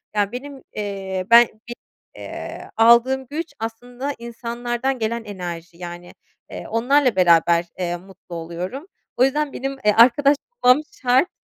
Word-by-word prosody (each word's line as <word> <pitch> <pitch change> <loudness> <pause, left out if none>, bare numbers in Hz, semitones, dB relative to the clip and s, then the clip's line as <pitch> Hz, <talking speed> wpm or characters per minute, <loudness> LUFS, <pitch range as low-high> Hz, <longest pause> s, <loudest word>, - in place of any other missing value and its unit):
Yani 205 -1 +1
benim, 270 +2 -8
eee, 195 -2 -4
ben 235 0 +9
benim, 235 +3 -13 0.3
eee, - - -8
aldığım 235 +4 +5
güç 325 +3 -5
aslında 245 +5 -5
insanlardan 240 +2 -3
gelen 230 +1 -2
enerji. 175 -5 -7
Yani, 175 0 -9 0.4
eee, - - -7
onlarla 255 +1 +2
beraber, 170 -1 +4
eee, 175 -1 -2
mutlu 185 -1 -13
oluyorum. 175 - -6 0.3
O 250 - +4
yüzden 285 +2 +1
benim, 270 +1 -3
eee, 210 - +6
arkadaş 270 +5 +6 0.3
bulmam 250 +4 +6 0.2
şart 260 +6 +3
235 Hz, 135 wpm, -21 LUFS, 185-260 Hz, 0.4 s, ben